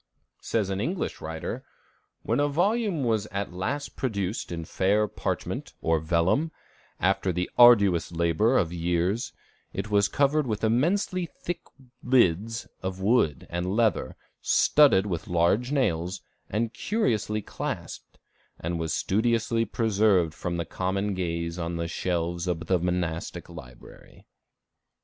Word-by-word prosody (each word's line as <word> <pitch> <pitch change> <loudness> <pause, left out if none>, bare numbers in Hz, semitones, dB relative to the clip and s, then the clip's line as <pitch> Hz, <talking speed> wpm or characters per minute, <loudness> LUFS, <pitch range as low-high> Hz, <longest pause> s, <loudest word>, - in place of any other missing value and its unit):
Says 105 -4 -1
an 95 +1 -2
English 170 - -3
writer: 80 0 -5 0.6
"When - - 0
a 145 - +3
volume 190 - +1
was 110 -3 0
at 100 -3 -4
last 130 +11 -3
produced 100 -6 -2
in 85 -1 -4
fair 100 +5 +1
parchment, - - -4
or 80 -1 +1
vellum, 85 - +1 0.5
after 95 0 +1
the 90 +1 -2
arduous 100 -9 +6
labor 85 +9 +2
of 85 -2 +1
years, 90 +6 0 0.4
it 100 +2 -4
was 100 -1 +4
covered 140 +5 +2
with 110 -1 -3
immensely 175 - +1 0.2
thick 175 - -3 0.4
lids 115 -2 +2
of 95 0 -4
wood 95 - +2
and 90 +3 -2
leather, 110 -2 +1 0.3
studded 140 -10 +5
with 85 -5 -3
large 90 +9 +2
nails, 90 - 0 0.3
and 110 +3 -1
curiously 110 - -1
clasped, - - -6 0.4
and 85 +1 -3
was 80 -2 -1
studiously 115 +2 +1
preserved 100 -8 +2
from 85 +1 -4
the 85 - -2
common 95 +4 -2
gaze 85 -1 -3
on 85 0 -3
the 85 0 -2
shelves 85 0 -2
of 85 -1 -2
the 90 +1 +2
monastic 85 -1 -2
library. 65 -8 -13
95 Hz, 130 wpm, -27 LUFS, 85-115 Hz, 0.6 s, arduous